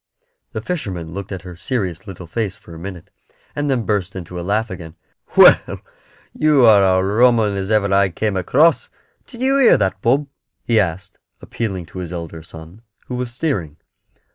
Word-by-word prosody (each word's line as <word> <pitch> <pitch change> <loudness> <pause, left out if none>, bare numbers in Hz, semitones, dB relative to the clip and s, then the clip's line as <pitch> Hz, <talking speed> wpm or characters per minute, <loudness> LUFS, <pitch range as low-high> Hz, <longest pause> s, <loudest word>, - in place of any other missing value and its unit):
The - - -4
fisherman 95 - -4
looked 100 +2 -7
at 95 -1 -6
her 90 -2 -9
serious 95 -3 -3
little 95 -2 -9
face 100 +3 -3
for 85 - -15
a 80 - -10
minute, 90 -1 -9 0.4
and 145 0 -1
then 130 -4 +1
burst 95 -4 -1
into 90 -1 -7
a - - -4
laugh 105 +4 -1
again. 85 -3 -9 0.4
"Well, - - +6 0.5
you 150 -5 +4
are 105 -3 +7
a 95 -1 +3
rum 120 +4 +4
'un 105 -2 0
as 95 0 -3
ever 105 -2 +2
I 100 0 +4
came 105 +3 -2
across. 140 - +2 0.4
Did 245 -2 -8
you 270 +1 +3
hear 260 - +6
that, 95 -1 -1
Bob?" 135 +6 +2 0.4
he 115 -2 +2
asked, 95 -1 -3 0.2
appealing 95 -7 -4
to 95 - -9
his 90 -2 -6
elder 85 -2 -6
son, 80 +5 -13 0.3
who - - -4
was 125 -1 -3
steering. 100 - -3
100 Hz, 185 wpm, -19 LUFS, 90-120 Hz, 0.5 s, are